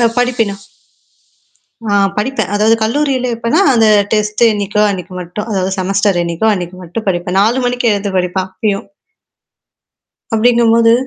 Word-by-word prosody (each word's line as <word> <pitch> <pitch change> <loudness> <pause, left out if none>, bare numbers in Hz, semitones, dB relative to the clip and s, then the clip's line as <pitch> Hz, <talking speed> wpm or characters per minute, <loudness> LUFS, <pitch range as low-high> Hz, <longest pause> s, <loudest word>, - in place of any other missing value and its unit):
அ - - +2 0.2
படிப்பனும் 230 -5 0 1.3
ஆ - - 0 0.3
படிப்பேன். 220 -4 -2
அதாவது 215 +2 +3
கல்லூரியில 260 0 0
எப்பேன்னா, 235 +10 0
அந்த 225 -2 +4 0.3
டெஸ்ட் 210 +1 -1
என்னைிக்கோ, 210 0 -1
அன்னைக்கு 185 -2 -6
மட்டும். 180 +5 -6
அதாவது 190 -1 -1
செமஸ்டர் 195 0 +1
எண்ணிக்கோ, 170 +5 -2
அன்னைக்கு 180 -1 -6
மட்டும் 195 +6 -6
படிப்பேன். 180 0 -1
4 230 +5 +1
மணிக்கு 245 -1 0
எழுந்து 200 -1 -3
படிப்பேன், 185 +1 -2
அப்பயும். 200 +1 -2 1.5
அப்படின்னும்போது 230 0 +4
210 Hz, 130 wpm, -14 LUFS, 190-230 Hz, 1.5 s, அந்த